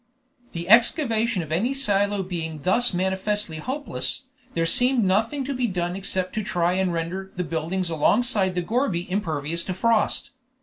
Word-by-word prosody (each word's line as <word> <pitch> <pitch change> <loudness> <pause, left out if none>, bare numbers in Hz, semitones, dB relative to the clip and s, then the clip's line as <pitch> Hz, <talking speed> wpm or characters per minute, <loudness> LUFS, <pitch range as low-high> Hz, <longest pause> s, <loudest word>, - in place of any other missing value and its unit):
The 170 0 -5
excavation 230 - +3
of 155 - -10
any 230 +12 0
silo 205 -6 +1
being 160 -5 -5
thus 240 +8 +3
manifestly 190 0 -1
hopeless, 270 - -3 0.3
there 165 0 +1
seemed 245 +7 +3
nothing 220 +9 +1
to 280 +2 -3
be 250 -2 0
done 175 -3 -2
except 190 -1 -1
to 215 - -2
try 175 -2 0
and 185 -1 +1
render 175 +3 -4
the 180 - -1
buildings 170 +2 -2
alongside 190 +3 +2
the 180 - 0
gourbi 215 -5 -1
impervious 170 -4 -2
to 185 - -3
frost. 230 +2 +1
190 Hz, 160 wpm, -24 LUFS, 175-225 Hz, 0.3 s, excavation